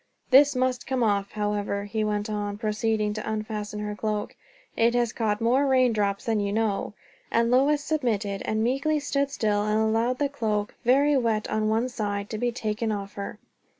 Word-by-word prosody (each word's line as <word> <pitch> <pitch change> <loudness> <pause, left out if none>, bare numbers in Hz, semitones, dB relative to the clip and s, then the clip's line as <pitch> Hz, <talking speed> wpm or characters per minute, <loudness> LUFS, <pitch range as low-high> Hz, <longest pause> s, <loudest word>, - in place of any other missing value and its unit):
"This 280 +2 +7
must 255 -1 0
come 260 -2 0
off, 200 -2 0
however," 205 -1 -1
he 215 +1 -2
went 210 0 -1
on, 205 -1 -3
proceeding 215 -1 0
to 215 0 -4
unfasten 215 -1 -4
her 210 0 -4
cloak; 210 -1 -3 0.4
"it 235 +1 +3
has 240 -2 +1
caught 210 -2 0
more 255 +5 +2
rain 255 -3 +4
drops 200 -2 -1
than 225 -2 +1
you 200 -1 -1
know." 210 -1 -1 0.3
And 230 +1 +2
Lois 285 +3 +3
submitted, 220 -10 -1
and 220 0 0
meekly 280 +6 +1
stood 280 -1 0
still 210 -6 0
and 215 +1 +1
allowed 225 +3 +1
the 285 - +1
cloak, 215 -7 -2
very 280 +4 +4
wet 225 -4 0
on 215 0 +1
one 225 +3 +1
side, 205 -4 -3
to 215 - -3
be 245 +1 0
taken 220 -1 -2
off 200 -1 -4
her. 200 +1 -6
220 Hz, 185 wpm, -26 LUFS, 210-250 Hz, 0.4 s, This